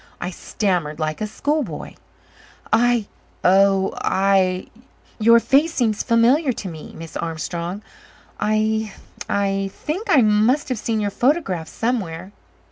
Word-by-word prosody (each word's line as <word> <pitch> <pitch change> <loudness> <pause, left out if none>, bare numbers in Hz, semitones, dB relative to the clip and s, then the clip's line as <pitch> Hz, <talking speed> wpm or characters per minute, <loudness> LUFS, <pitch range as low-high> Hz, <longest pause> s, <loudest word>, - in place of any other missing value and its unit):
I 180 - -4
stammered 175 -5 -2
like 155 +2 -2
a 215 - -1
schoolboy. 295 +8 -3 0.8
"I 240 -2 +3 0.4
oh 195 +1 +4
I 190 -1 +2 0.5
your 230 +2 +6
face 295 +7 +2
seems 220 -4 +1
familiar 250 +6 +3
to 215 - -6
me, 160 -3 -9
Miss 165 0 -9
Armstrong. 170 +4 -4 0.6
I 215 0 0 0.4
I 195 -1 0
think 360 - -5
I 270 -5 +6
must 220 +7 +2
have 255 -4 -2
seen 220 -1 -1
your 205 -1 -1
photograph 240 - 0
somewhere." 190 -7 -3
210 Hz, 125 wpm, -21 LUFS, 185-240 Hz, 0.8 s, your